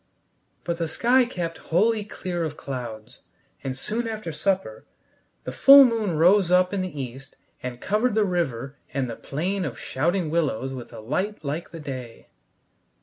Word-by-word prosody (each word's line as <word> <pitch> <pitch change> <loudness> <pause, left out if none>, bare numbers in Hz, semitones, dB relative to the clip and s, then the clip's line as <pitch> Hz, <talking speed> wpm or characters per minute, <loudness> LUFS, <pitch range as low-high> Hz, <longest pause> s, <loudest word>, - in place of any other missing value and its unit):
But 170 -1 -2
the 165 -1 -1
sky 245 +10 +3
kept 170 -8 -4
wholly 215 +6 +3
clear 180 -4 -4
of 155 -1 -4
clouds, 125 -4 -7 0.4
and 130 -1 -3
soon 230 - -2
after 215 -6 -4
supper 185 - -2 0.6
the - - -5
full 275 - +9
moon 220 -8 0
rose 180 +3 +5
up 180 +1 +4
in 195 - 0
the 180 -6 -5
east 135 +1 -7 0.3
and 125 -1 -5
covered 215 - +1
the 215 -1 +3
river 140 -7 -2 0.2
and 135 -2 0
the 115 - -5
plain 180 - -2
of 130 -8 -4
shouting 165 +6 -1
willows 135 -6 0
with 125 -2 -8
a - - -9
light 185 - -3
like 150 +5 -3
the 165 - -9
day. 130 -6 -8
165 Hz, 165 wpm, -25 LUFS, 135-200 Hz, 0.6 s, full